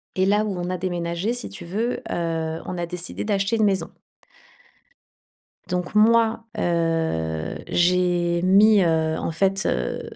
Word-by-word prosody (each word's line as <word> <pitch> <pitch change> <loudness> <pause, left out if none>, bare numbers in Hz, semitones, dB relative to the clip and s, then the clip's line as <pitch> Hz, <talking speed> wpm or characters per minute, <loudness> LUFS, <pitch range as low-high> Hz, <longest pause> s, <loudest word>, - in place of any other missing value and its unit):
Et 190 0 +2
là 210 +2 +3
où 200 -4 -3
on 175 +1 -3
a 185 - -2
déménagé 175 +3 -2
si 245 - -4
tu 100 - -8
veux, 220 +8 -2
heu, 165 -1 -2
on 180 - -5
a 170 - -2
décidé 175 0 -4
d'acheter 200 +1 0
une 220 - +1
maison. 190 -5 0 1.8
Donc 180 +2 -3
moi, 225 +1 +4
heu, 160 - -1
j'ai 175 -1 +2
mis, 200 +3 +5
heu, 160 -1 +1
en - - -3
fait, 190 +3 0
heu, 60 -1 -1
180 Hz, 150 wpm, -23 LUFS, 165-200 Hz, 1.8 s, mis